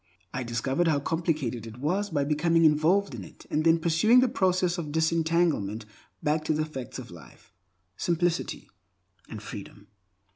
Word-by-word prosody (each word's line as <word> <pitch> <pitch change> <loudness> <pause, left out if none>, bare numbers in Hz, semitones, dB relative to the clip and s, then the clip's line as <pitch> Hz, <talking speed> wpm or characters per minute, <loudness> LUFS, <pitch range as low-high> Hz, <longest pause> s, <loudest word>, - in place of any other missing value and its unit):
I 125 - -2
discovered 130 +7 0
how 150 -3 +3
complicated 145 - -2
it 115 +1 -10
was 185 +10 -1
by 145 - 0
becoming 165 +3 +2
involved 160 +6 +3
in - - -6
it - - -14
and 155 - +1
then 165 0 +5
pursuing 170 +9 +4
the 255 - +4
process 185 -7 +1
of 150 -3 -5
disentanglement 160 - +1 0.4
back 155 +1 +1
to 155 - +1
the 155 0 0
facts 135 -5 -7
of 130 -7 -9
life, 75 -8 -15 0.4
simplicity, 175 0 -1 0.6
and 110 -1 -8
freedom. 100 -1 -10
155 Hz, 155 wpm, -27 LUFS, 130-170 Hz, 0.6 s, then